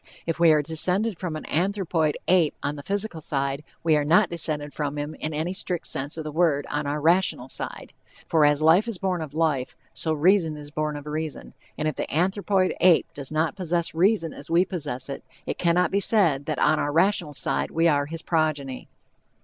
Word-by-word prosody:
If 165 0 -2
we 170 -1 +6
are 150 -1 +3
descended 180 +6 0
from 175 -4 -4
an 155 - -6
anthropoid 175 -3 0
ape 175 -4 +3
on 145 - -2
the 145 - -7
physical 200 0 -3
side, 140 0 -2 0.2
we 160 -2 +3
are 150 - +2
not 175 +7 +3
descended 150 -3 -1
from 145 -1 -3
him 145 +1 -4
in 155 - -5
any 160 +4 -2
strict 180 -3 -1
sense 140 +4 -3
of 160 - -4
the 155 - -5
word 155 -3 +1
on 145 0 -2
our 145 +1 -1
rational 165 -5 +2
side; - - -4 0.3
for 160 -2 +2
as 145 +1 +3
life 175 +8 +5
is 230 -5 -4
born 180 -2 -1
of 150 -2 -7
life, 155 -6 0 0.2
so 160 - 0
reason 160 0 +2
is 145 0 -10
born 155 0 -2
of 145 0 -8
reason, 155 0 -5 0.2
and 155 - -1
if 155 - -2
the - - -4
anthropoid 190 +3 +1
ape 180 -2 +4
does 140 -1 -6
not 155 +3 0
possess 175 -3 -1
reason 175 -1 +2
as 145 - -8
we 170 +3 +4
possess 145 -9 -4
it, 140 - -6 0.2
it - - -4
cannot 175 0 +2
be 200 - +2
said 170 -10 +2
that 155 -3 -1
on 155 - +3
our 145 - -1
rational 165 -2 +1
side - - 0
we 165 +1 +2
are 145 -3 +2
his 165 +1 -7
progeny. 150 -5 -1
160 Hz, 210 wpm, -25 LUFS, 150-180 Hz, 0.3 s, we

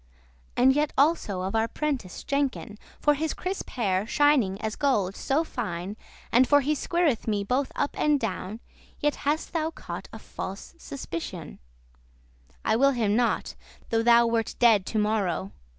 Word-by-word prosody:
And 260 +2 +6
yet 295 +1 0
also 275 - +2
of 190 - -3
our 225 0 +2
prentice 265 -10 -3
Jenkin, 270 -6 -2 0.2
For 295 - +4
his 310 +2 -2
crisp 375 +2 -4
hair, 200 -4 0
shining 260 -10 +3
as 220 -1 -3
gold 205 -9 +1
so 285 +4 0
fine, 205 - -4 0.4
And 250 +2 +5
for 285 0 +5
he 295 +3 +1
squireth 310 -5 0
me 205 -2 0
both 255 +6 0
up 285 - -1
and 300 -1 +3
down, 215 0 -4 0.4
Yet 295 0 +1 0.2
hast 310 +3 -1
thou 320 -1 0
caught 325 - -8
a - - -8
false 195 +1 -7
suspicioun: 165 - -6 1.1
I - - +3
will 275 +2 +4
him 215 -4 +1
not, 240 0 +1 0.4
though 225 0 +3
thou 235 0 +6
wert 230 -1 0
dead 225 -6 +4
to 220 - -2
morrow. 200 - 0
235 Hz, 160 wpm, -26 LUFS, 205-285 Hz, 1.1 s, And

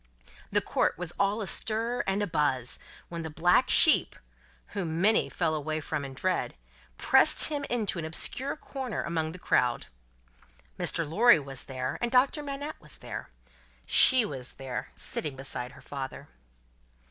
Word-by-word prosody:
The - - +3
court - - 0
was 175 -1 -5
all 200 +2 +1
astir 230 +5 -1
and 195 +2 0
a - - +1
buzz, 145 - -1 0.3
when 170 -1 -5
the 160 - -5
black 175 +11 +2
sheep 315 - +5 0.5
whom 170 -5 -3
many 215 +4 +3
fell 165 -3 -1
away 155 +1 -2
from 150 -1 -4
in 135 -1 -8
dread 185 +6 -1 0.4
pressed - - +4
him 290 -2 -3
into 215 -7 -1
an 160 - -4
obscure 260 - -1
corner 265 -6 -5
among 160 -2 -2
the 180 - -9
crowd. 125 -8 +1 0.9
Mr. 165 - 0
Lorry 220 +7 +6
was 135 -3 -8
there, 130 -1 -4
and 240 - 0
Doctor 265 +4 +3
Manette 285 +1 -6
was - - -9
there. - - -8 0.6
She 255 -3 +7
was 130 -6 -7
there, 130 -2 -6
sitting 150 -4 -1
beside 130 -2 -4
her - - -15
father. 135 -2 -7
170 Hz, 155 wpm, -28 LUFS, 145-235 Hz, 0.9 s, She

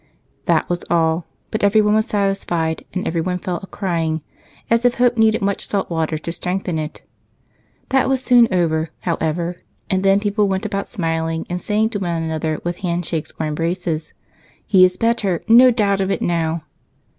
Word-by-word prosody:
That - - +2
was 175 0 -2
all, 165 0 +1 0.2
but 220 - -2
everyone 210 +1 +4
was 215 0 +2
satisfied, 195 -5 -1
and 185 - -3
everyone 175 +2 -1
fell 180 -1 -3
a 195 - -9
crying, 165 -6 -2 0.4
as 230 +1 +2
if 245 -1 +3
hope 245 0 +3
needed 220 -2 +3
much 200 0 -1
salty 195 -4 -2
water 160 -1 -1
to 165 +2 -5
strengthen 180 -1 -2
it. 155 0 -6 0.9
That 265 0 +2
was 265 -1 +2
soon 245 -2 +6
over, 165 -3 +1
however, 170 +1 -1 0.3
and 190 0 +2
then 195 +1 +4
people 205 0 +1
went 190 -1 -1
about 200 0 -2
smiling 165 -4 -2
and 180 0 -2
saying 220 +1 +1
to 205 - -2
one 170 -3 -2
another, 160 -1 -2
with 175 0 -3
handshakes 170 -3 -2
or 160 - 0
embraces, 165 +1 -2 0.5
"He 190 -3 +5
is 180 0 +4
better 215 -7 0
no 240 +3 +8
doubt 205 -5 +1
of 190 - 0
it - - -1
now!" 165 -2 0
180 Hz, 175 wpm, -20 LUFS, 165-205 Hz, 0.9 s, no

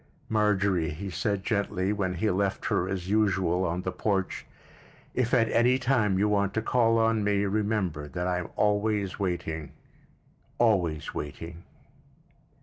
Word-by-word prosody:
"Marjorie," 100 -6 +2
he 95 +6 -6
said 100 +3 -1
gently, 100 -2 0
when 95 -3 -1
he 105 +5 +1
left 95 +1 -1
her, 90 - 0
as 95 -2 -3
usual, 95 -4 +2
on 90 +1 -2
the 95 - -2
porch, 95 0 -2 0.7
"if 125 -2 0
at 115 -3 +4
any 125 +2 +4
time 120 -7 +1
you 100 +2 +2
want 100 -1 +1
to 110 - +1
call 115 -1 +3
on 115 -1 +2
me, 100 0 +1
remember 100 -7 -1
that 90 +4 -4
I 90 -1 0
am 90 - -6
always 105 -1 0
waiting, 80 -5 -3 0.8
always 90 -10 +1
waiting." 80 +4 -6
100 Hz, 145 wpm, -27 LUFS, 90-105 Hz, 0.8 s, at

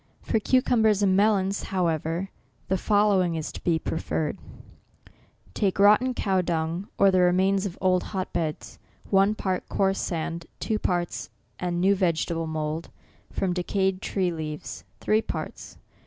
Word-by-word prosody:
For 220 - +1
cucumbers 220 -3 +3
and 190 -1 +3
melons, 200 -1 +2
however, 170 0 -1 0.4
the 190 - +2
following 200 -5 +3
is 160 -1 -4
to - - -10
be 170 -2 +2
preferred: 160 -1 -2 1.1
Take 195 -3 0
rotten 215 +6 +5
cow 190 -4 +1
dung, 170 +2 -2
or 195 -1 +5
the 185 - +3
remains 190 +2 +3
of 185 - -9
old 185 -1 +2
hot 190 -3 -4
beds, 160 -3 -3 0.3
one 195 +2 +4
part; 190 -4 -2
coarse 195 0 +1
sand, 165 0 -3
two 215 -1 -1
parts; 175 -3 -2 0.3
and 175 -1 -1
new 195 +3 +4
vegetable 170 -3 0
mould, 155 +1 -3 0.4
from 185 -2 -1
de 180 - -1
cayed 190 0 0
tree 185 -3 0
leaves, 155 -2 -6
three 215 +1 +2
parts. - - -6
185 Hz, 145 wpm, -26 LUFS, 170-200 Hz, 1.1 s, rotten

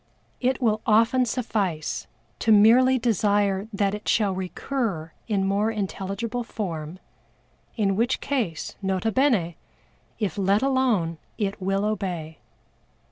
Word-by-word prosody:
It 260 +1 +1
will 215 -3 +1
often 230 +4 +4
suffice 200 - -2 0.3
to 225 - +2
merely 240 +5 +6
desire 205 -4 +1
that 200 -1 0
it 210 - -6
shall 205 -4 +2
recur 185 - -3 0.2
in 200 -4 +1
more 200 +3 +1
intelligible 215 +3 -3
form 175 -8 -5 0.8
in 195 -3 +1
which 235 +5 +1
case, 235 - -2
nota 190 +3 0
bene 225 - +2 0.6
if 205 -3 -2
let 200 +4 +2
alone 240 -12 +1 0.2
it 200 -2 -2
will 195 +2 0
obey. 180 -7 -3
205 Hz, 120 wpm, -25 LUFS, 190-230 Hz, 0.8 s, merely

